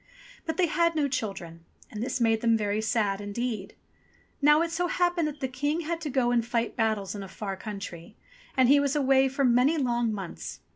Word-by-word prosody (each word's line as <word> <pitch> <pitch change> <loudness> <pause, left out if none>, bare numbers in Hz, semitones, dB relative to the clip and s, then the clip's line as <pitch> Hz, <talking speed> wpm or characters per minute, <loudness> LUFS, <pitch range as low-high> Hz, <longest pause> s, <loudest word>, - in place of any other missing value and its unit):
But 320 - -2
they 370 - +4
had 335 +1 +1
no 295 -2 +2
children, 195 -10 -5 0.3
and 210 - -6
this 255 +1 -2
made 225 -2 +2
them 230 -1 +3
very 210 0 -1
sad 210 -3 0
indeed. 210 0 -4 0.7
Now 295 +3 +5
it 335 - -3
so 350 +1 0
happened 350 -2 +1
that 300 -1 -7
the 265 - 0
King 290 +5 -1
had 335 +1 -3
to 305 - -3
go 250 -2 +1
and 240 -1 +2
fight 235 0 -2
battles 220 -4 0
in 205 - -6
a 195 - -7
far 195 +1 -5
country, 195 -4 -8 0.4
and 260 -1 +5
he 285 +2 +6
was 285 0 0
away 270 -2 +4
for 275 +1 0
many 250 +6 +4
long 240 -4 +1
months. 195 -4 -6
245 Hz, 205 wpm, -27 LUFS, 215-290 Hz, 0.7 s, he